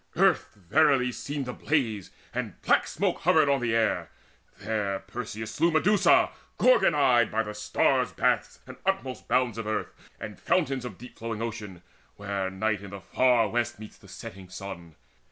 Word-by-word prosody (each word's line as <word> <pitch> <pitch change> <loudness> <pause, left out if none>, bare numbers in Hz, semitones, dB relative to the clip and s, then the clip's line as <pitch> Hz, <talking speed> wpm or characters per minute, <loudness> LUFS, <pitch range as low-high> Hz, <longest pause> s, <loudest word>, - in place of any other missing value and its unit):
Earth - - +2
verily 125 - +3
seemed 140 +2 -5
Ablaze, 125 - -1 0.2
and - - -4
black - - +3
smoke - - -1
hovered - - +4
on 140 -2 +2
the 115 -2 0
air. 115 -1 +1 0.5
There 105 -3 -2
Perseus 110 +2 -6
slew 170 - +2
Medusa 175 +6 +4 0.3
gorgon - - +5
eyed 125 -5 +4
By 110 +1 0
the 105 -1 -6
stars' 105 0 +1
baths - - 0
and - - -11
utmost 190 -10 -2
bounds 125 -3 +1
of 110 - -4
earth 110 - -2 0.3
And - - -8
fountains 130 -2 0
of 105 -7 -7
deep 125 +2 -13
flowing 115 -1 -4
Ocean, 105 -6 -6 0.3
where 100 -2 -3
Night 105 +1 -1
in 100 - -9
the 100 +1 -8
far 125 +1 +3
west 120 0 -1
meets 110 0 -12
the - - -17
setting 95 0 -10
sun. 90 -4 -8
115 Hz, 165 wpm, -27 LUFS, 100-130 Hz, 0.5 s, gorgon